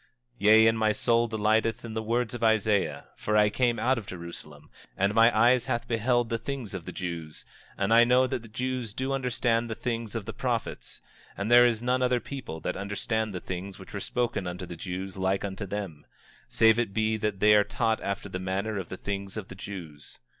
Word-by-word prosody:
25:5 - - -34 0.4
Yea, 110 +1 +8
and 115 0 +2
my 110 -1 +3
soul 115 +2 +2
delighteth 110 +2 +1
in 115 - -6
the 110 - -2
words 115 +2 -1
of 120 -1 -5
Isaiah, 110 -3 +1
for 105 0 0
I 105 0 +5
came 120 -1 +1
out 130 +1 +2
from 115 - -5
Jerusalem, 85 -4 -9 0.3
and 100 +2 +2
mine 115 +1 +6
eyes 120 +3 +4
hath 120 - -2
beheld 120 +1 +1
the 115 -1 -1
things 125 -4 -5
of 90 -4 -6
the - - -6
Jews, 85 -4 -6 0.3
and 115 - +1
I 115 +1 +8
know 125 +2 +4
that 125 - -2
the 115 - -12
Jews 125 -1 -3
do 130 +2 -2
understand 120 -3 0
the 110 - -3
things 115 -2 -3
of 110 -3 -3
the 115 - -5
prophets, 115 - -4 0.3
and 100 +4 -2
there 120 0 +8
is 115 -1 -1
none 125 +1 +1
other 125 -1 +2
people 130 - -7
that 90 - -2
understand 105 +2 -2
the 90 - -4
things 95 +2 -6
which 95 - -13
were 100 - -3
spoken 115 -3 -2
unto 90 +1 -5
the 85 - -8
Jews 95 +2 -6
like 95 +1 0
unto 100 +1 -5
them, 95 -7 -6 0.4
save 110 0 +4
it 110 -5 -2
be 110 0 +1
that 105 -2 -2
they 105 +1 +6
are 105 - +6
taught 110 +1 -1
after 100 +1 -3
the 90 -2 -5
manner 100 +3 -2
of 95 - -7
the 95 - -6
things 100 +1 -5
of 100 -3 -6
the - - -7
Jews. 90 -7 -9
110 Hz, 220 wpm, -28 LUFS, 95-120 Hz, 0.4 s, Yea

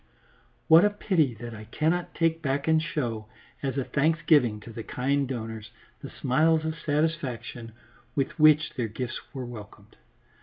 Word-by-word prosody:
What 165 +2 +8
a 210 - +5
pity 175 - +1
that 120 +1 -8
I 110 0 -9
cannot 160 +9 -1
take 165 -1 +1
back 140 0 -1
and 160 0 +4
show, 120 -10 -3 0.3
as 135 -1 -2
a 135 - +1
thanksgiving 145 -6 +2
to 115 - -10
the 115 - -6
kind 135 +4 -1
donors, 110 -3 -5 0.3
the - - -7
smiles 155 +4 +2
of 160 - -1
satisfaction 145 -7 -2 0.4
with 140 +3 -2
which 155 0 +5
their 120 -3 -2
gifts 120 +3 -5
were 130 -3 -5
welcomed. 105 -3 -11
135 Hz, 155 wpm, -27 LUFS, 115-160 Hz, 0.4 s, What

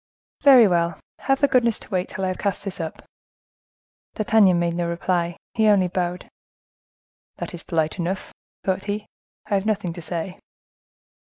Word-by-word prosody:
"Very 260 -6 +8
well; 170 -2 +1 0.2
have 270 0 +1
the 285 - +6
goodness 235 -4 +3
to - - -12
wait 185 -1 -1
till 190 - -5
I - - 0
have 185 - -4
cast 200 -2 -1
this 195 -2 -6
up." 160 -1 -5 1.1
D'Artagnan 215 -4 +4
made 170 0 0
no 170 0 -1
reply; 170 0 -1 0.2
he 220 -2 +3
only 200 -3 +5
bowed. 180 0 -2 1.1
"That - - -6
is 175 - -7
polite 160 -1 -1
enough," 180 +3 -3 0.3
thought 190 0 -1
he; 210 +1 -3 0.4
"I 210 - -4
have 200 +1 +1
nothing 200 -5 -1
to 170 - -8
say." 175 +2 -4
185 Hz, 165 wpm, -23 LUFS, 175-210 Hz, 1.1 s, Very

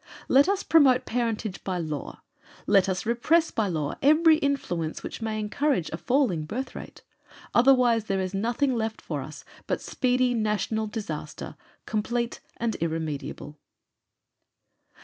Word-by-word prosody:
Let 280 +6 +5
us 400 0 0
promote 275 -6 +5
parentage 225 -4 -2
by 185 -2 -2
law; 155 -4 -5 0.4
let 195 -2 +4
us 185 +2 -2
repress 305 +9 +2
by 220 -2 0
law 155 -5 -2
every 310 +3 +6
influence 220 - -2
which - - -6
may 220 -1 -2
encourage 215 - 0
a 160 - -3
falling 240 - +1
birth 250 +11 -4
rate; - - -10 0.5
otherwise 240 -3 +4
there 195 -2 -1
is 185 0 -3
nothing 240 +7 0
left 220 -1 -3
us 150 +1 -5 0.2
but - - 0
speedy 250 -1 +1
national 220 0 -1
disaster, 160 -10 -6 0.3
complete 235 +2 -2 0.2
and 230 -1 -1
irremediable." 155 -2 -4
220 Hz, 130 wpm, -26 LUFS, 180-255 Hz, 0.5 s, every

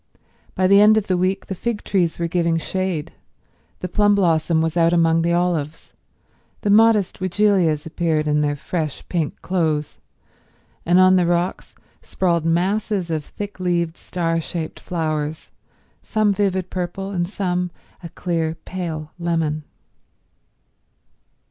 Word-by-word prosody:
By 185 - +1
the 200 +2 +6
end 215 +1 +6
of 215 - +1
the 185 - +1
week 185 +2 0
the - - -4
fig 220 +3 -3
trees 175 -4 0
were 170 - -1
giving 170 -1 +1
shade, 185 -2 -3 0.7
the 180 - -2
plum 205 +2 +3
blossom 165 -3 +2
was 160 0 0
out 170 0 +3
among 165 -1 +3
the 170 +1 +1
olives, 170 -3 -1 0.7
the 205 - +1
modest 215 -2 +4
weigelias 185 -5 +2
appeared 160 -2 -1
in 150 0 +2
their 145 -1 0
fresh 155 0 -4
pink 165 -5 -2
clothes, 155 - -1 0.9
and 175 +2 +5
on 185 0 +6
the 175 -2 +2
rocks 175 +1 -1 0.3
sprawled 170 -3 0
masses 185 +2 0
of 155 -2 -1
thick 205 +5 -8
leaved, 170 -2 0
star 165 -3 -2
shaped 160 0 -5
flowers, 155 -2 -3 0.5
some 215 -2 +1
vivid 190 -2 -1
purple 185 +2 -4
and 175 -2 -1
some 180 -3 -1 0.3
a 170 - -8
clear, 165 -2 -2
pale 160 -4 -5
lemon. 160 -3 -1
175 Hz, 140 wpm, -21 LUFS, 160-190 Hz, 0.9 s, the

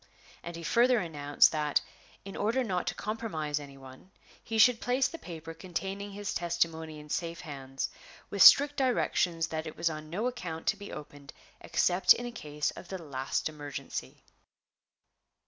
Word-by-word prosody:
And 170 0 -7
he 170 - -7
further 245 +7 +4
announced 145 -6 +3
that, 150 -2 +1 0.4
in 195 - -8
order 230 +5 +1
not 185 -6 -2
to - - -1
compromise 165 -10 -3
any 140 -1 -11
one, 130 +5 -14 0.3
he 225 - -3
should 230 +1 +6
place 255 +2 +2
the 330 - -9
paper 165 -2 -8
containing 195 +4 -5
his 205 0 -4
testimony 165 -2 -1
in 150 - -12
safe 170 +2 -3
hands, 135 -4 -5 0.4
with 200 - -1
strict 290 +7 +9
directions 180 -10 +1
that 160 0 -3
it 155 - -8
was 170 - +1
on 155 0 -7
no 200 +8 -2
account 180 -11 -4
to - - +1
be 205 0 -9
opened 145 -1 -10 0.3
except 180 +1 +4
in 245 - -5
a 240 - -4
case 150 -8 -3
of - - -11
the 190 - -5
last 135 -5 -2
emergency. 145 -2 -7
170 Hz, 165 wpm, -30 LUFS, 150-205 Hz, 0.4 s, strict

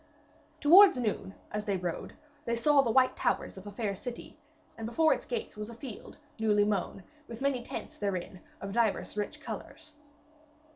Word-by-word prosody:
Towards 360 +2 +8
noon, 210 -5 -2 0.2
as 210 0 -3
they 200 -2 0
rode, 175 -2 -4 0.3
they 235 - 0
saw 285 +4 +5
the 250 - -1
white 255 +3 +4
towers - - -1
of 190 +1 -10
a - - -6
fair 205 -1 -2
city, 240 +4 -8 0.4
and 225 -1 -5
before 315 +7 +4
its - - -6
gates 465 - -4
was 210 +1 -6
a 235 - -9
field 235 -3 -9 0.2
newly 210 -2 +3
mown, 200 -2 -2 0.2
with 230 -1 -8
many 270 -2 0
tents - - -7
therein 185 -3 -3 0.2
of 195 - -5
divers 225 -2 0
rich 210 -1 -3
colours. 320 -1 -8
225 Hz, 175 wpm, -30 LUFS, 205-260 Hz, 0.4 s, Towards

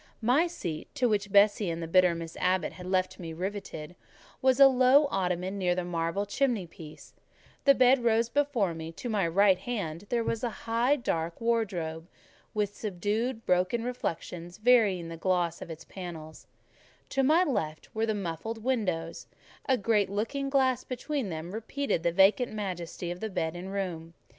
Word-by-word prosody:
My 255 +9 +3
seat, 175 - -5
to 255 -4 +2
which 205 -2 0
Bessie 205 -1 +4
and 165 0 -3
the 165 - -4
bitter 180 0 +4
Miss 165 0 -7
Abbot 185 0 +1
had 180 0 -9
left 185 0 0
me 165 -2 -6
riveted, 180 -2 -5 0.5
was 260 0 +3
a 275 - +10
low 260 +2 +5
ottoman 185 +1 -1
near 180 -2 +1
the 180 -1 -2
marble 170 +3 -1
chimney 230 -2 0
piece; 160 -2 -13 0.5
the 275 -1 +7
bed 255 0 +5
rose 230 0 +3
before 240 -8 +1
me; 160 0 -6
to 240 - -6
my 200 -6 +1
right 190 +2 +4
hand 200 -6 -4
there 235 -1 +1
was 225 0 -2
the 245 - -1
high, 230 +5 +1
dark 170 - -2
wardrobe, 180 -9 -1 0.5
with 205 -1 -1
subdued, 220 +4 -2
broken 185 +6 +1
reflections 175 -7 -5
varying 215 -7 +3
the 165 - -7
gloss 175 -1 0
of - - -7
its 160 -1 -8
panels; 165 -4 -9 0.6
to 270 - +1
my 310 +7 +4
left 185 - -3
were 220 +1 0
the 220 - 0
muffled 205 +4 -4
windows; 185 -10 -2 0.4
a 260 - +4
great 210 -2 +1
looking 230 +8 -2
glass 260 -2 +2
between 260 -2 -3
them 160 +1 -5
repeated 225 - -2
the 170 0 +1
vacant 195 +7 +4
majesty 180 -4 -4
of 175 - -6
the 220 - -3
bed 165 -4 -2
and 185 +2 -6
room. 170 -4 -4
200 Hz, 170 wpm, -29 LUFS, 175-235 Hz, 0.6 s, a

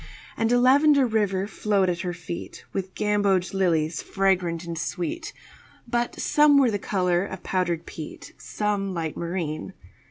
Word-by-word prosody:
And 225 0 0
a 245 - +4
lavender 280 +2 +5
river 205 -4 0
flowed 200 -1 0
at 175 -1 -1
her 180 -1 -2
feet 170 0 -7
With 190 -1 -4
gamboge 200 -3 +1
lilies 165 -5 +1
fragrant 180 -4 0
and 170 -1 -5
sweet, 180 - -4 0.6
But 240 0 -1
some 295 -1 +5
were 265 -4 +4
the 205 - -1
color 180 -3 +1
of 190 -2 -7
powdered 175 -3 -1
peat, 155 -2 -9
Some 200 -2 -2
light 160 -2 -3
marine. 170 0 -4
190 Hz, 150 wpm, -25 LUFS, 175-215 Hz, 0.6 s, lavender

